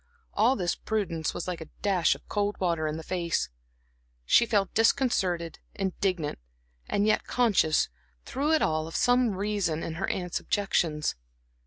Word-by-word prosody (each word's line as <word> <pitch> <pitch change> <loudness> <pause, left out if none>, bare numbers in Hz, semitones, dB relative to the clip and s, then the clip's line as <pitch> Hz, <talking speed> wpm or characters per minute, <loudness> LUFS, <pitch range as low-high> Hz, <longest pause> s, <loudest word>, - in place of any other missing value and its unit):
All 235 +5 +4
this 180 -5 0
prudence 180 -8 -2
was - - -4
like 180 -2 -4
a 160 - -7 0.2
dash 190 -5 +3
of - - -16
cold 205 0 -1
water 170 -4 0
in 155 +1 -3
the 160 - -7
face. 170 -1 -1 0.8
She 235 - +5
felt 200 -4 +1
disconcerted, 190 - +1 0.2
indignant, 185 - -1 0.5
and 205 - +1
yet 215 0 +2
conscious, 205 -10 +3 0.4
through 290 +4 0
it 315 - +3
all 155 0 0
of 165 - -8
some 245 -4 +3
reason 195 -5 -1
in 165 - -4
her - - 0
aunts' 180 -2 -2
objections. 165 -7 0
185 Hz, 155 wpm, -28 LUFS, 165-215 Hz, 0.8 s, She